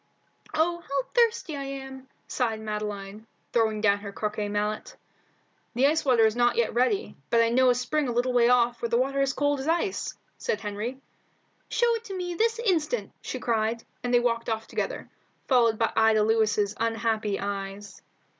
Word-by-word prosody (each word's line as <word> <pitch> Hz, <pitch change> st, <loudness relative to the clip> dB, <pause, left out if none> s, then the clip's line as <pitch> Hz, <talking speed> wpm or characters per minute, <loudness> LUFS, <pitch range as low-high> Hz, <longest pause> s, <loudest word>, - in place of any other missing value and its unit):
"Oh, 340 Hz, +2 st, +1 dB
how 280 Hz, -5 st, -2 dB
thirsty 460 Hz, -9 st, +2 dB
I 280 Hz, -, -4 dB
am!" 270 Hz, -1 st, -7 dB, 0.2 s
sighed 225 Hz, -4 st, -1 dB
Madeline, 210 Hz, 0 st, -5 dB, 0.3 s
throwing 220 Hz, -2 st, +2 dB
down 205 Hz, -1 st, +3 dB
her 200 Hz, -1 st, -7 dB
croquet 210 Hz, 0 st, -3 dB
mallet. 210 Hz, +1 st, -2 dB, 0.8 s
"The 255 Hz, +3 st, +3 dB
ice 315 Hz, +3 st, +3 dB
water 245 Hz, -5 st, +4 dB
is 220 Hz, 0 st, +2 dB
not 240 Hz, 0 st, +3 dB
yet 235 Hz, -, +1 dB
ready, 255 Hz, -, +1 dB
but 235 Hz, -, +3 dB
I 230 Hz, 0 st, +4 dB
know 255 Hz, +2 st, +4 dB
a 245 Hz, -, +4 dB
spring 280 Hz, +4 st, 0 dB
a -, -, -1 dB
little 245 Hz, +2 st, 0 dB
way 240 Hz, -1 st, +4 dB
off 240 Hz, -1 st, +3 dB
where 235 Hz, -, -1 dB
the 235 Hz, -, +2 dB
water 275 Hz, +2 st, +1 dB
is 275 Hz, -1 st, +2 dB
cold 290 Hz, +1 st, +1 dB
as 265 Hz, -, -5 dB
ice," 345 Hz, +4 st, -1 dB, 0.2 s
said 215 Hz, -, -1 dB
Henry. 210 Hz, +5 st, -4 dB, 0.7 s
"Show 475 Hz, -1 st, +2 dB
it 460 Hz, 0 st, -3 dB
to 390 Hz, -3 st, -5 dB
me 355 Hz, -1 st, -3 dB
this 450 Hz, +6 st, +1 dB
instant," 410 Hz, -1 st, 0 dB
she -, -, -5 dB
cried, 225 Hz, -1 st, 0 dB, 0.2 s
and 245 Hz, -, -1 dB
they 245 Hz, -, +5 dB
walked 235 Hz, -1 st, 0 dB
off 220 Hz, 0 st, -2 dB
together, -, -, -4 dB, 0.4 s
followed 235 Hz, -4 st, +4 dB
by 225 Hz, -, 0 dB
Ida 220 Hz, -1 st, +4 dB
Lewis's 215 Hz, -2 st, +2 dB
unhappy 225 Hz, -2 st, 0 dB
eyes. 200 Hz, 0 st, -5 dB
235 Hz, 185 wpm, -27 LUFS, 215-275 Hz, 0.8 s, they